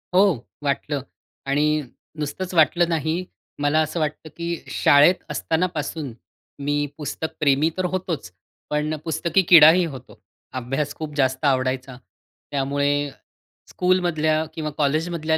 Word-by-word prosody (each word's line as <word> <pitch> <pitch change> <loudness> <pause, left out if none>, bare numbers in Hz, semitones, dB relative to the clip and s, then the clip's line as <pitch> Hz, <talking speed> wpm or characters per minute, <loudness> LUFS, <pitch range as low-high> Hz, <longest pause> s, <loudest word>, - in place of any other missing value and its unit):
हो, 190 - +7 0.4
वाटलं 145 0 -1 0.5
आणि 145 +2 +2 0.5
नुसतंच 180 +5 -4
वाटलं 170 +1 +4
नाही. 165 +2 -1 0.4
मला 145 +2 +3
असं 155 +2 -2
वाटतं 155 0 -3
की 170 - -4 0.2
शाळेत 145 +5 +5
असतानापासून 160 -5 -2 0.5
मी 145 +1 0
पुस्तक 160 +1 -4
प्रेमी 150 +1 +3
तर 185 - 0
होतोच, 175 - -3 0.4
पण 150 +1 -1
पुस्तकी 170 +3 +1
किडाही 170 +1 +8
होतो. 130 -5 -10 0.4
अभ्यास 135 +4 -2
खूप 155 -2 -6
जास्त 130 -1 +1
आवडायचा. 130 -1 0 0.5
त्यामुळे 140 +1 +1 0.8
स्कूलमधल्या 170 -4 +1
किंवा 155 -1 -3
कॉलेजमधल्या 160 +2 0
155 Hz, 115 wpm, -23 LUFS, 145-165 Hz, 0.8 s, किडाही